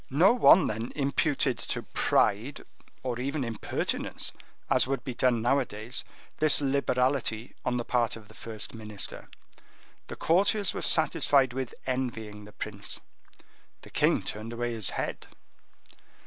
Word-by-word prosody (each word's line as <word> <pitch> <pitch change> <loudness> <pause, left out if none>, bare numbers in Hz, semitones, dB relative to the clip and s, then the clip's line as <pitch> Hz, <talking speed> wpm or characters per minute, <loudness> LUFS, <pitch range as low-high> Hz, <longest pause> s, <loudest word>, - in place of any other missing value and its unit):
No 170 - +5
one 190 -8 +7
then 110 +2 -3
imputed 140 +1 +1
to - - -2
pride, 110 +7 +1 0.4
or 125 -2 -2
even 140 +3 -2
impertinence, 115 -3 -2 0.4
as - - +4
would 135 0 -2
be 130 - -4
done 120 -2 +2
nowadays, 120 -2 0 0.4
this 155 -1 +6
liberality 130 -4 0
on 125 -1 0
the 120 - -3
part 120 -2 +1
of 110 -2 -12
the 110 - -16
first 110 -1 -6
minister. 105 -3 -4 0.8
The - - -7
courtiers 195 +3 +2
were - - -4
satisfied 145 -5 +3
with 130 -1 -4
envying 110 -5 -3
the 105 - -13
prince.—The 100 -1 -9
king - - +2
turned 110 +2 -5
away 120 0 -2
his 110 -5 +2
head. - - -4
125 Hz, 135 wpm, -28 LUFS, 110-140 Hz, 0.8 s, one